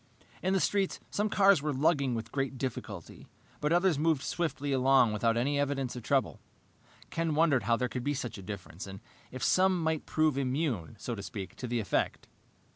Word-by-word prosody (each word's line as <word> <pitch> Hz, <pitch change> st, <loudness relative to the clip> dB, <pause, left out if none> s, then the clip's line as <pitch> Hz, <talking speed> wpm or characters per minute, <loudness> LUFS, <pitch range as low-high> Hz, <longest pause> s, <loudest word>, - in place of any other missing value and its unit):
In 185 Hz, +1 st, +1 dB
the 195 Hz, -, +3 dB
street, 195 Hz, 0 st, +1 dB
some 210 Hz, +1 st, 0 dB
cars 195 Hz, -5 st, +5 dB
were 150 Hz, +1 st, -1 dB
lugging 140 Hz, -2 st, +2 dB
with 115 Hz, 0 st, -5 dB
great 135 Hz, -1 st, -2 dB
difficulty, 110 Hz, -, -6 dB, 0.3 s
but 150 Hz, -, 0 dB
others 175 Hz, -3 st, +3 dB
moved 155 Hz, -3 st, +2 dB
swiftly 155 Hz, -4 st, -2 dB
along 130 Hz, -3 st, +4 dB
without 115 Hz, +2 st, +1 dB
any 140 Hz, +4 st, +1 dB
evidence 135 Hz, -3 st, -1 dB
of 125 Hz, -, -5 dB
trouble. -, -, 0 dB, 0.7 s
Ken 165 Hz, -2 st, -1 dB
wondered 150 Hz, -8 st, +3 dB
how 115 Hz, +1 st, +3 dB
there 125 Hz, -, 0 dB
could 125 Hz, 0 st, -5 dB
be 145 Hz, +2 st, 0 dB
such 120 Hz, -5 st, -5 dB
a -, -, -8 dB
difference, 95 Hz, -2 st, -7 dB
and 95 Hz, 0 st, -8 dB, 0.3 s
if 130 Hz, -, -6 dB
some 185 Hz, -1 st, +4 dB
might 160 Hz, -2 st, -1 dB
prove 155 Hz, -3 st, +2 dB
immune, 130 Hz, -, -1 dB
so 120 Hz, -, -4 dB
to 100 Hz, -, -5 dB
speak, 100 Hz, -2 st, -6 dB
to 125 Hz, -, -5 dB
the 120 Hz, 0 st, -1 dB
effect. 105 Hz, -, -1 dB
135 Hz, 195 wpm, -30 LUFS, 115-160 Hz, 0.7 s, cars